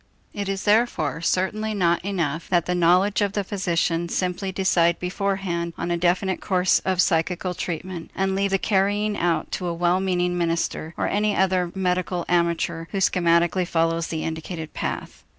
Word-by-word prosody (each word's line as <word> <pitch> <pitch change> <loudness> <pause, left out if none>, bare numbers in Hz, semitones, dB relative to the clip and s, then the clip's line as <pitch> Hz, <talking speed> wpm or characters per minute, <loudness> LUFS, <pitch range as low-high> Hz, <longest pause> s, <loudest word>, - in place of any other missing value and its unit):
It 200 -1 -3
is 195 0 -2
therefore 205 -8 +1
certainly 210 +5 0
not 170 -3 +2
enough 170 -5 -2
that 175 -3 +2
the 180 - -1
knowledge 180 +4 +3
of 200 -1 +1
the 205 - -1
physician 175 -3 -1
simply 185 +2 -2
decide 175 -3 +2
beforehand 180 -2 -2
on 170 +1 -3
a - - +2
definite 180 +2 +1
course 185 -1 +2
of 185 -2 -1
psychical 180 +2 0
treatment 175 0 -5
and 190 0 0
leave 200 +1 +1
the 195 - +2
carrying 205 +1 +1
out 170 -2 0
to 180 - -3
a 170 - -2
well 175 +2 +2
meaning 180 -2 0
minister 165 -1 -1
or - - 0
any 210 0 +1
other 185 -2 +1
medical 180 -1 -1
amateur 170 -1 0
who - - -4
schematically 175 -1 +2
follows 165 0 +1
the 160 -1 -3
indicated 160 0 -5
path. - - -5
180 Hz, 170 wpm, -24 LUFS, 170-195 Hz, -, knowledge